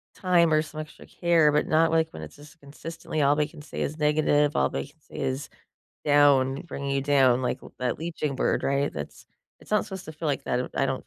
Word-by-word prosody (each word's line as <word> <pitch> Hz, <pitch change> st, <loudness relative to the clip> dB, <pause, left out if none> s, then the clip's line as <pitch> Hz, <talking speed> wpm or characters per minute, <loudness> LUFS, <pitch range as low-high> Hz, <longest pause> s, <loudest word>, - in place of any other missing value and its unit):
time 170 Hz, -4 st, +3 dB
or 155 Hz, -, +4 dB
some 155 Hz, 0 st, -6 dB
extra 155 Hz, -, -12 dB
care, 165 Hz, -4 st, +3 dB
but 150 Hz, -, +1 dB
not, 160 Hz, +1 st, +3 dB
like, 160 Hz, 0 st, +2 dB
when 80 Hz, -, -9 dB
it's 75 Hz, -, -11 dB
just 150 Hz, +2 st, -16 dB
consistently 155 Hz, +2 st, -6 dB
all 140 Hz, +1 st, +4 dB
they 150 Hz, 0 st, +1 dB
can 150 Hz, -, -13 dB
say 150 Hz, -, -7 dB
is 155 Hz, +2 st, -2 dB
negative, 150 Hz, -1 st, +2 dB
all -, -, +2 dB
they -, -, -3 dB
can 155 Hz, +2 st, -24 dB
say -, -, -13 dB
is 130 Hz, +2 st, -3 dB, 0.6 s
down, 140 Hz, -1 st, +4 dB
bringing 140 Hz, -5 st, -5 dB
you 135 Hz, -1 st, 0 dB
down, 130 Hz, -3 st, +3 dB
like, 125 Hz, -, -1 dB
l -, -, -13 dB
that 125 Hz, 0 st, -1 dB
leaching 155 Hz, -4 st, -3 dB
bird, -, -, +1 dB
right? 140 Hz, +1 st, 0 dB
That's 75 Hz, -1 st, -8 dB, 0.3 s
it's -, -, -17 dB
not 210 Hz, -, +2 dB
supposed 190 Hz, -3 st, -8 dB
to 160 Hz, -, -7 dB
feel 155 Hz, +1 st, -5 dB
like 140 Hz, -, -2 dB
that, 125 Hz, +1 st, -1 dB
I 135 Hz, -, +2 dB
don't 130 Hz, 0 st, -4 dB
150 Hz, 235 wpm, -26 LUFS, 140-160 Hz, 0.6 s, or